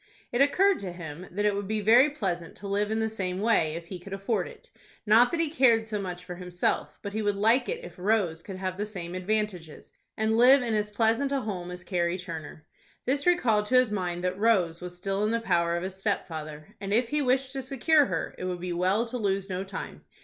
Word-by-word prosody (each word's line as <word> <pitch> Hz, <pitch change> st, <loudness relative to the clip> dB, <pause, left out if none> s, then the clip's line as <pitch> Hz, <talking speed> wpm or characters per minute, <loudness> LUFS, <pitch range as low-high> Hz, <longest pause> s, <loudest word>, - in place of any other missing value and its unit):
It 240 Hz, -, +1 dB
occurred 380 Hz, +7 st, +4 dB
to 190 Hz, -2 st, -5 dB
him 170 Hz, 0 st, -8 dB
that 205 Hz, +4 st, -2 dB
it 210 Hz, -, +3 dB
would 200 Hz, -1 st, -3 dB
be 215 Hz, +1 st, -1 dB
very 235 Hz, +7 st, +6 dB
pleasant 180 Hz, -, -4 dB
to 200 Hz, -, -8 dB
live 205 Hz, +1 st, 0 dB
in 220 Hz, -, 0 dB
the 220 Hz, -, +1 dB
same 190 Hz, -4 st, -3 dB
way 195 Hz, -8 st, +2 dB
if 170 Hz, 0 st, -6 dB
he 180 Hz, +1 st, -8 dB
could 195 Hz, +2 st, -9 dB
afford 195 Hz, -1 st, -1 dB
it; 480 Hz, -, -15 dB, 0.3 s
not 230 Hz, +3 st, +6 dB
that 335 Hz, -, -2 dB
he 325 Hz, -3 st, +2 dB
cared 235 Hz, -6 st, +4 dB
so 210 Hz, -2 st, -2 dB
much 180 Hz, -2 st, -6 dB
for 180 Hz, -1 st, -7 dB
himself, 180 Hz, -1 st, -2 dB
but 200 Hz, -, -5 dB
he 220 Hz, -, -1 dB
would 205 Hz, -1 st, 0 dB
like 225 Hz, +6 st, +3 dB
it 480 Hz, +1 st, -4 dB
if -, -, -12 dB
Rose 185 Hz, -5 st, +1 dB
could 190 Hz, +2 st, -8 dB
have 185 Hz, 0 st, -4 dB
the 210 Hz, -, 0 dB
same 180 Hz, -4 st, -6 dB
advantages, 185 Hz, -4 st, -3 dB, 0.3 s
and 220 Hz, +1 st, +1 dB
live 255 Hz, +2 st, +7 dB
in 230 Hz, -2 st, -1 dB
as 210 Hz, -1 st, 0 dB
pleasant 225 Hz, +6 st, +1 dB
a 275 Hz, -1 st, 0 dB
home 185 Hz, -5 st, -4 dB
as 180 Hz, 0 st, -8 dB
Carrie 175 Hz, -1 st, 0 dB
Turner. 165 Hz, -4 st, -8 dB, 0.4 s
This 280 Hz, +5 st, 0 dB
recalled 225 Hz, -12 st, +3 dB
to 255 Hz, -, +1 dB
his 255 Hz, -3 st, +5 dB
mind 180 Hz, -3 st, -2 dB
that 185 Hz, +1 st, -1 dB
Rose 185 Hz, -7 st, +2 dB
was 180 Hz, 0 st, -7 dB
still 195 Hz, +2 st, -1 dB
in 210 Hz, -, +2 dB
the 230 Hz, +1 st, +1 dB
power 170 Hz, -5 st, +1 dB
of 170 Hz, -, -4 dB
his 190 Hz, 0 st, -5 dB
stepfather, 155 Hz, -7 st, -4 dB
and 195 Hz, 0 st, -4 dB
if 230 Hz, +3 st, +2 dB
he 300 Hz, 0 st, 0 dB
wished 260 Hz, 0 st, +1 dB
to 270 Hz, -, -3 dB
secure 275 Hz, +3 st, +3 dB
her 165 Hz, -3 st, -3 dB
it -, -, -4 dB
would 180 Hz, -1 st, -3 dB
be 180 Hz, 0 st, -3 dB
well 185 Hz, +6 st, +1 dB
to 245 Hz, +1 st, -5 dB
lose 195 Hz, -2 st, -1 dB
no 185 Hz, +1 st, -2 dB
time. 195 Hz, -, -7 dB
200 Hz, 240 wpm, -27 LUFS, 180-230 Hz, 0.4 s, live